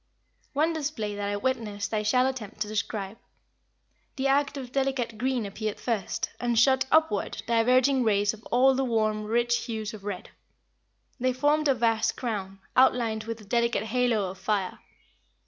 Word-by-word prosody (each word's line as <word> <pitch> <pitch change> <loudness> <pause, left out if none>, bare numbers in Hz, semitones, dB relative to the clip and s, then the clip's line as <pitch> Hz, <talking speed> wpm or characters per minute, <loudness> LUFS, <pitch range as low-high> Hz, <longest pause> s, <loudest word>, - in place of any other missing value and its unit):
One 310 +4 +2
display 285 -9 -3
that 205 0 -3
I 205 - -1
witnessed 220 -3 -2
I 215 - +1
shall 250 +4 +3
attempt 235 -6 -4
to 210 - 0
describe. 210 -1 -3 1.0
The 270 0 0
arc 280 +1 +2
of 255 -3 -7
delicate 265 -4 -1
green 255 -2 0
appeared 210 +1 -4
first, 225 -6 -2
and 240 -1 0
shot 265 +3 +4
upward 315 -10 +2
diverging 250 +3 +3
rays 205 -1 +2
of 220 0 -13
all 260 +2 +4
the 265 +1 0
warm, 215 -3 0
rich 235 +2 +1
hues 220 -2 -4
of 210 -2 -10
red. 200 -3 -6 0.9
They 255 +1 +1
formed 295 +4 +2
a 275 - +4
vast 225 -1 +1
crown, 195 -5 -4
outlined 230 -4 +3
with 230 0 -5
a - - -14
delicate 235 0 +1
halo 225 -4 +1
of 190 - -13
fire. 195 -1 -1
230 Hz, 165 wpm, -27 LUFS, 210-260 Hz, 1.0 s, shot